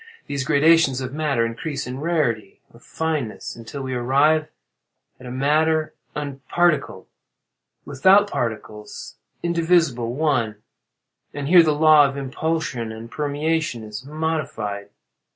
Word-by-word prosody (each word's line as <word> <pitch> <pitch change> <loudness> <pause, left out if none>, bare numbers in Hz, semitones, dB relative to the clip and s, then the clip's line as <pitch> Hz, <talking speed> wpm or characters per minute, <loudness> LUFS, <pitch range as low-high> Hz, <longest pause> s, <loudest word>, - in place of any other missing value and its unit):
These 140 -2 -3
gradations 145 -2 +4
of 130 0 -5
matter 145 -6 0
increase 135 +6 -4
in 125 +2 -6
rarity 140 - -1
or 115 - -16
fineness, 135 0 -4
until 120 +4 -8
we 130 -1 -4
arrive 140 +6 +2 0.7
at 130 - -11
a - - -6
matter 155 +4 +1 0.2
unparticled—without 145 - -1
particles—indivisible—one; 125 +2 -2 0.7
and 145 -1 -4
here 175 +2 +8
the 155 -2 +2
law 155 -1 +6
of 135 - -7
impulsion 140 -3 -3
and 110 +2 -9
permeation 150 -1 -2
is 105 +3 -8
modified. 140 -10 -3
140 Hz, 105 wpm, -22 LUFS, 120-155 Hz, 0.7 s, here